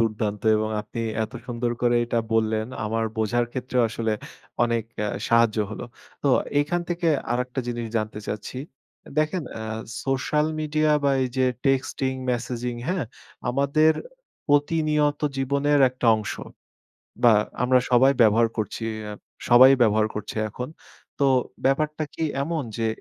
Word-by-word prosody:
দুর্দান্ত 110 -2 -1
এবং 110 0 -1
আপনি 115 +3 -6 0.2
এত 110 - -11
সুন্দর 120 0 -2
করে 120 0 +3
এটা 120 0 -1 0.2
বললেন 110 0 +1 0.2
আমার 115 +1 -1
বোঝার 120 +2 +1
ক্ষেত্রেও 125 -1 0
আসলে 110 0 -2 0.5
অনেক 115 -2 0 0.2
আ - - -1 0.2
সাহায্য 115 -1 +4
হলো। 115 - -6 0.4
তো 140 - +2 0.3
এখান 175 +4 0
থেকে 175 -1 0 0.2
আরেকটা 125 +2 -2
জিনিস 120 -1 -3
জানতে 110 -1 -2
চাচ্ছি। 105 +4 -5 0.6
দেখেন 155 +3 +1 0.2
আ - - -4 0.4
সোশ্যাল 140 +3 +1
মিডিয়া 155 0 +1
বা 140 - +4
এই 130 - 0
যে 130 - +4 0.2
টেক্সটিং 135 0 +1 0.2
মেসেজিং, 120 0 -2
হ্যাঁ? 180 -6 0 0.5
আমাদের 140 +4 +3 0.6
প্রতিনিয়ত 150 0 +2 0.2
জীবনের 140 +2 +2
একটা 125 -1 -3
অংশ। 110 -1 -4 0.9
বা 120 - +8 0.3
আমরা 125 0 +4
সবাই 130 +2 +6
ব্যবহার 115 +1 +5
করছি 110 +1 -3 0.3
আ - - -5 0.4
সবাই 130 +2 +9
ব্যবহার 110 -1 +4
করছে 105 +1 -5
এখন। 125 +3 -5 0.5
তো 140 - +5 0.4
ব্যাপারটা 150 +3 +1
কি 165 - -2 0.2
এমন 160 -1 -2
যে 115 -1 0
125 Hz, 140 wpm, -24 LUFS, 115-145 Hz, 0.9 s, সবাই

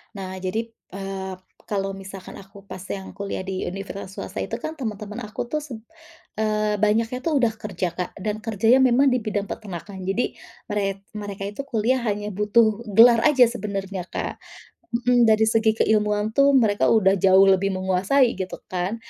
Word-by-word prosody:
Nah, 190 -1 -6
jadi 220 +5 -3
p - - -33 0.2
eee, 195 -1 -5 0.3
kalau 195 -1 -1
misalkan 195 -1 -9
aku 200 0 -14
pas 190 -1 -9 0.2
yang 190 -1 -8
kuliah 200 -1 -5
di 190 0 -4
universitas 195 +1 -7
swasta 185 - -6
itu - - -3
kan 285 +7 -5
teman-teman 215 -2 -5
aku 210 - -5
tuh 305 - 0
seb 255 -7 -9 0.6
eee, 215 -1 0
banyaknya 225 +4 +1
tuh 330 - +1
udah 235 -3 +3
kerja, 190 -4 -3
Kak, 180 -1 -3
dan 210 0 -1
kerjanya 225 +3 +3
memang 260 +1 +4
di 250 - +1
bidang 205 -2 -3
peternakan, 190 -1 -7
jadi 210 +6 0 0.4
merek 195 -1 -2
mereka 200 -1 -6
itu 205 - -5
kuliah 240 +1 +1
hanya 205 0 -2
butuh 215 +2 +2
gelar 235 +1 +8
aja 280 -4 +6
sebenarnya, 195 -5 -4
Kak. - - -5 0.5
Mhm, 240 -1 +3
dari 220 0 +5
segi 220 0 +2
keilmuan 210 0 +1
tuh 275 +3 +4
mereka 215 -5 +3
udah 200 -4 +4
jauh 190 +1 +6
lebih 195 0 +3
menguasai 190 +8 +2
gitu, 185 - -4 0.2
kan. 185 +4 -1
210 Hz, 170 wpm, -23 LUFS, 195-230 Hz, 0.6 s, gelar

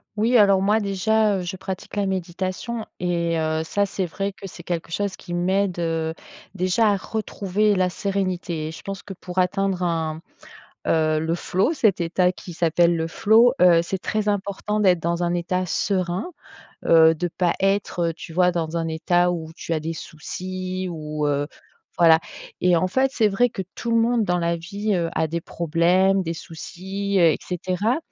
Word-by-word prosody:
Oui, 225 +4 +2
alors, 200 -2 +5
moi, 210 +3 +3
déjà, 210 +1 +1
heu, - - -3
je 180 +2 -4
pratique 190 +2 -6
la 200 -1 0
méditation 190 +5 -3
et 170 -2 0
heu, 160 0 0
ça, 200 +5 0
c'est 190 -2 -3
vrai 195 +4 -3
que 195 - -9
c'est 175 -2 -11
quelque 170 -1 -4
chose 200 +1 -2
qui 175 -2 -7
m'aide, 185 +1 +1
heu, 165 -1 -1 0.4
déjà, 185 +5 +2
à 200 - +1
retrouver 210 0 -1
la 185 -1 +2
sérénité 185 -5 -2
et - - -6
je - - -10
pense 195 -1 -6
que 195 - -8
pour 180 0 -10
atteindre 190 0 +1
un, 160 -2 -1 0.7
heu, 155 -1 +2
le 160 +1 -1
flow, 185 - 0
cet 215 - +2
état 180 +2 +2
qui 180 -1 -9
s'appelle 170 +1 +2
le 165 -1 -1
flow, 230 +8 +4
heu, 170 -2 +7
c'est 190 +3 -3
très 210 +2 -2
important 205 +1 -1
d'être 180 -4 +4
dans 170 +1 -1
un 175 0 +1
état 180 +1 -1
serein, 185 - -1 0.6
heu, 160 -1 +7
de 175 +2 -2
pas 175 0 0
être, 195 -1 0
heu, - - -4
tu 165 0 -10
vois, 180 0 +4
dans 170 -1 -2
un 165 0 -1
état 175 +2 +2
où 160 -2 -5
tu 165 - -4
as 155 - 0
des 165 +2 -4
soucis 185 +4 -5
ou 150 -2 -3
heu 145 0 0 0.5
voilà 165 -1 +7 0.4
et 180 -1 +4
en 170 - +2
fait, 265 +7 +2
c'est 220 -5 +3
vrai 235 +5 +2
que 190 - -5
tout 235 - -5
le 230 - +3
monde 230 0 +2
dans 180 -2 +1
la 170 0 0
vie, 200 +5 -3
heu, 170 -2 0
a - - +2
des 165 +2 -3
problèmes, 175 +4 +2
des 165 -1 -3
soucis, 190 +4 -5
heu 175 - +5
et - - -1
cetera 185 +6 -1
180 Hz, 190 wpm, -23 LUFS, 170-200 Hz, 0.7 s, heu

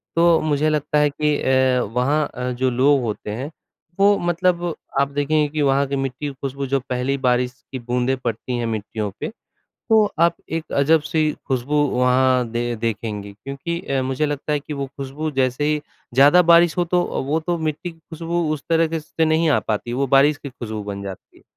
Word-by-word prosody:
तो 170 0 +5
मुझे 155 0 +1
लगता 150 0 0
है 150 0 +4
कि 150 +1 0
अ, 130 -1 +3
वहाँ 140 +5 +2
अ, 125 0 -3
जो 130 +1 0
लोग 135 +3 +3
होते 105 -2 -4
हैं, 130 +8 -5 0.5
वो 200 +1 +5
मतलब 175 0 0 0.4
आप 140 - +3
देखेंगे 145 +1 +1
कि 155 +1 -2
वहाँ 140 0 +3
की 140 - -2
मिट्टी 135 +1 -3
की - - -3
ख़ुशबू 135 +1 -5
जो 135 +1 +1
पहली 130 +1 -2
बारिश 125 -1 +1 0.2
की 130 - -4
बूँदें 125 +2 0
पड़ती 120 0 -3
हैं 120 - -2
मिट्टियों 110 -1 -3
पे, - - -3 0.6
तो 220 -2 +5 0.2
आप 170 0 +4 0.2
एक 165 -1 -4
अजब 155 +3 +4
सी 155 0 +1 0.2
ख़ुशबू 135 +2 0
वहाँ 125 0 +2
दे 120 +1 -2
देखेंगे। 105 -2 -4
क्योंकि 140 +10 -5
अ, 135 -1 -1
मुझे 135 +3 -1
लगता 145 +1 -3
है 150 - +1
कि 150 - -8
वो 140 -1 -3
ख़ुशबू 140 +3 -5
जैसे 130 0 0
ही 150 0 +1 0.3
ज़्यादा 145 +7 +7
बारिश 170 -1 +5
हो 175 - +3
तो 175 +1 +1 0.2
वो 150 +3 +1
तो 175 +2 -1
मिट्टी 160 +2 -3
की 165 - -18
ख़ुशबू 165 +1 -3
उस 150 - -8
तरीके 165 -1 +1
से 150 - -22
तो 165 - +5
नहीं 160 +1 +2
आ - - +4
पाती, 110 +2 -3
वो 135 +3 0
बारिश 140 +3 +4
की 145 - -8
ख़ुशबू 110 -4 -6
बन 100 -1 -5
जाती 95 -1 -9
है। - - -24
140 Hz, 205 wpm, -21 LUFS, 125-155 Hz, 0.6 s, ज़्यादा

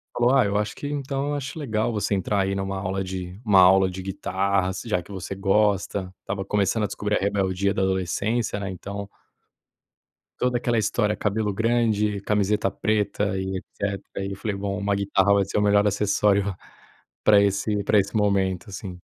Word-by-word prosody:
falou: 120 +2 +3
"Ah, 130 -5 +5
eu 100 +1 0
acho 105 0 -2
que - - -8
então, 140 0 -2
eu - - -1
acho 145 +2 -4
legal 110 -6 -1
você 105 -2 -1
entrar, 100 +1 0
aí, 95 0 0
numa 95 0 -3
aula 95 0 -2
de 95 +1 -6
uma 100 -4 +5
aula 95 +1 +6
de 95 - -7
guitarra, 95 -1 0
se 105 - -7
já 105 -5 0
que 95 - -14
você 95 0 -5
gosta". 100 -1 +1
Estava 95 0 -4
começando 105 +2 +1
a - - +3
descobrir 105 0 -2
a - - -2
rebeldia 100 0 0
da 95 - -1
adolescência, 100 +4 0
né, 100 - -4
então 100 +2 -6 1.3
toda 125 -1 +1
aquela 120 -1 0
história: 105 0 +1
cabelo 105 0 -1
grande, 110 -2 +1
camiseta 105 -1 +1
preta 105 -1 -1
e 95 0 -2
etcétera. 100 0 -5
E 100 - -4
eu - - -4
falei: 100 +1 -3
"Bom, 100 0 -3
uma 100 0 0
guitarra 100 0 +2
vai 100 -1 +3
ser 100 - -3
o - - +3
melhor 105 0 +4
acessório 100 0 +2 0.7
pra 105 -1 +6
esse 100 +1 0
pra 105 +2 +4
esse 100 +2 -2
momento", 100 -1 +1
sim. 95 -2 -7
100 Hz, 190 wpm, -24 LUFS, 95-105 Hz, 1.3 s, aula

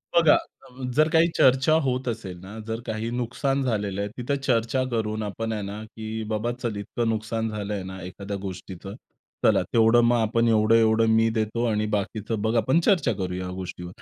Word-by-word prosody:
बघा, 165 -3 +6
अ, 130 +1 -8
जर 155 +2 +5
काही 165 +1 +4
चर्चा 130 +4 +5
होत 130 -1 -1
असेल 105 -6 -4
ना, 95 +4 -10
जर 110 0 -3
काही 110 0 -3
नुकसान 125 +3 -1
झालेलं 100 -5 -1
आहे. 100 - -2
तिथं 125 +3 -1
चर्चा 120 +2 +2
करून 110 -2 -1
आपण 110 +2 -3
आहे 105 - -3
ना 100 +2 -6
की 110 0 -6
बाबा 110 +3 -1
चल 120 -3 -4
इतकं 115 +3 -2
नुकसान 110 +1 -1
झालंय 105 -2 -4
ना, 95 0 -8
एखाद्या 100 +2 -6
गोष्टीचं, 95 +1 -7 0.5
चला - - +5
तेवढं 115 +1 +5
मग 120 +1 +4
आपण 115 +1 +2
एवढं-एवढं 110 0 +4
मी 115 0 +4
देतो 110 +2 0
आणि 105 -1 0
बाकीचं 105 +2 -3
बघा 110 +2 +1
आपण 130 +8 +3
चर्चा 170 - +2
करूया 90 -2 -3
या - - -5
गोष्टीवर 90 -1 -7
110 Hz, 185 wpm, -25 LUFS, 105-120 Hz, 0.5 s, बघा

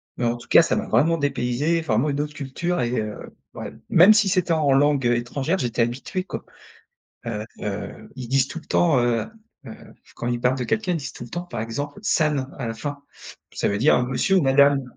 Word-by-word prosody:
mais - - -4
en 120 0 +1
tout 120 +1 -14
cas - - +7
ça 165 - 0
m'a - - -2
vraiment 165 +2 +3
dépaysé, 145 +3 0
vraiment 145 -2 +1
une 145 0 -1
autre 150 0 -4
culture 145 +6 -3
et 120 -2 0
heu, 105 -1 -7 0.2
ouais, - - -7 0.2
même 185 +6 +7
si 210 -2 +3
c'était 180 -3 +1
en 155 -3 +2
langue, 140 -1 +3
heu, 120 0 +3
étrangère 135 +8 -2
j'étais 120 -7 -1
habitué, 125 +10 -2
quoi. - - -7 0.8
Heu 105 -2 -3 0.2
heu, 105 0 -6
ils 130 -2 -6
disent 135 +1 +2
tout 145 - -6
le 160 - -14
temps, 165 -6 +3
heu 120 -1 +1 0.4
heu, - - -8 0.4
quand 120 - -4
ils 120 -1 -1
parlent 125 +2 +2
de 125 - -3
quelqu'un 185 - 0
ils - - 0
disent 135 -6 -6
tout - - -9
le 120 - -13
temps 175 - -4
par 175 - -6
exemple 140 - -5
«san» 150 -9 +1
à 125 - -3
la - - -2
fin 145 +5 -6 0.5
ça - - -1
veut 100 - 0
dire 125 +3 +4
monsieur 190 +8 +1
ou - - +5
madame 140 +1 +4
135 Hz, 225 wpm, -23 LUFS, 120-160 Hz, 0.8 s, cas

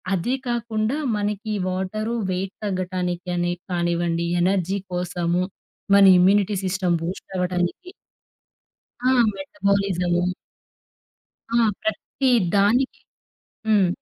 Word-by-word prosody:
అది 215 +9 0
కాకుండా 230 +1 -1 0.2
మనకి 210 +1 -3
ఈ - - -1
వాటరు 215 +5 -2 0.2
వెయిట్ 190 +1 -3
తగ్గటానికాని 180 -2 -2 0.2
కానివ్వండి, 170 -1 0 0.2
ఎనర్జీ 190 +1 +1
కోసము, 175 0 0 0.5
మన 200 - +7 0.2
ఇమ్యూనిటీ 200 +2 +4
సిస్టమ్ 185 -2 +1
బూస్ట్ 175 +3 -5
అవ్వటానికి 180 - -1 1.1
ఆ! - - +2 0.3
మెటబాలిజము. 195 -3 0 1.3
ఆ! - - +2 0.3
ప్రతి 235 +5 -1 0.3
దానికి 245 +7 +2 0.7
హ్మ్. 205 -4 +4
190 Hz, 90 wpm, -23 LUFS, 180-205 Hz, 1.3 s, మన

